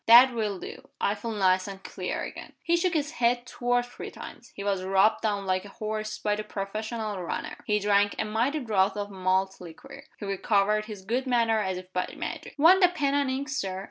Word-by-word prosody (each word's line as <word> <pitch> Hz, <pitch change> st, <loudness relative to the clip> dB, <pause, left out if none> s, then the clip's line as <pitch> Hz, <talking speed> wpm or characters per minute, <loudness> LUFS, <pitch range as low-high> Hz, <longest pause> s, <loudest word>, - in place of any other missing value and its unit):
"That 245 Hz, +3 st, +9 dB
will 215 Hz, -4 st, -1 dB
do. -, -, -9 dB
I 200 Hz, -, +2 dB
feel 215 Hz, +2 st, -6 dB
nice 185 Hz, -2 st, +2 dB
and 195 Hz, -1 st, -8 dB
clear -, -, -4 dB
again." -, -, -8 dB
He 340 Hz, -, +3 dB
shook 345 Hz, 0 st, +1 dB
his 300 Hz, -1 st, 0 dB
head 245 Hz, -4 st, +1 dB
two 245 Hz, -, -11 dB
or 245 Hz, 0 st, +3 dB
three 245 Hz, -, -8 dB
times, -, -, -11 dB
he 200 Hz, -, -6 dB
was 200 Hz, -2 st, 0 dB
rubbed 195 Hz, +3 st, +3 dB
down 205 Hz, -2 st, -1 dB
like 185 Hz, 0 st, 0 dB
a 205 Hz, -, -10 dB
horse 215 Hz, 0 st, -4 dB
by 210 Hz, 0 st, 0 dB
the 215 Hz, -, -4 dB
professional 215 Hz, 0 st, -4 dB
runner; 175 Hz, -, -4 dB
he 210 Hz, -, +3 dB
drank 205 Hz, 0 st, +3 dB
a 220 Hz, -, 0 dB
mighty 235 Hz, +8 st, 0 dB
draught 210 Hz, -3 st, +1 dB
of 205 Hz, 0 st, -4 dB
malt 190 Hz, 0 st, 0 dB
liquor; 170 Hz, -3 st, -11 dB
he -, -, -7 dB
recovered 200 Hz, +2 st, +1 dB
his 210 Hz, -4 st, -9 dB
good 245 Hz, +6 st, 0 dB
humor 230 Hz, -3 st, +2 dB
as 190 Hz, -3 st, -1 dB
if 185 Hz, 0 st, -10 dB
by 180 Hz, -, -1 dB
magic. -, -, -6 dB
"Want 345 Hz, +6 st, +7 dB
the 360 Hz, -, +8 dB
pen 290 Hz, -6 st, 0 dB
and 285 Hz, -1 st, +2 dB
ink, 270 Hz, +2 st, -2 dB
Sir?" 195 Hz, -10 st, -2 dB
215 Hz, 220 wpm, -27 LUFS, 195-245 Hz, -, That